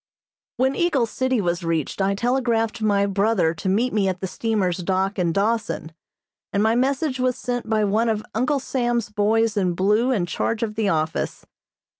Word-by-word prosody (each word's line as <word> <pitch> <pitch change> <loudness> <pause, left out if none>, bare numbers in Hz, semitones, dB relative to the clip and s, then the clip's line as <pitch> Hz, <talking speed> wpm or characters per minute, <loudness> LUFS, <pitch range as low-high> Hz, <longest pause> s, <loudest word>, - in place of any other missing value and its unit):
When 265 +2 +1
Eagle 325 -9 +2
City 260 +2 -1
was 175 -2 -1
reached 165 +2 -1
I 195 +1 +1
telegraphed 235 -1 0
my 200 -2 +2
brother 200 -4 +1
to 180 +3 -3
meet 230 +7 +1
me 205 -2 +2
at 185 -1 -2
the 190 - -3
steamer's 195 -3 -1
dock 190 +2 -1
in 175 -2 +1
Dawson, 205 -3 -1 0.6
and 200 +1 +1
my 220 +1 +3
message 265 +2 0
was 255 -1 +1
sent 245 -2 -3
by 215 -1 +2
one 215 +3 +1
of 215 -1 -1
Uncle 255 +6 +1
Sam's 240 -4 -1
boys 215 +1 +1
in 185 -4 +1
blue 210 +7 +2
in 210 -9 +1
charge 225 +5 -2
of 215 -2 -2
the 215 -2 0
office. 160 -2 -2
215 Hz, 180 wpm, -23 LUFS, 195-240 Hz, 0.6 s, my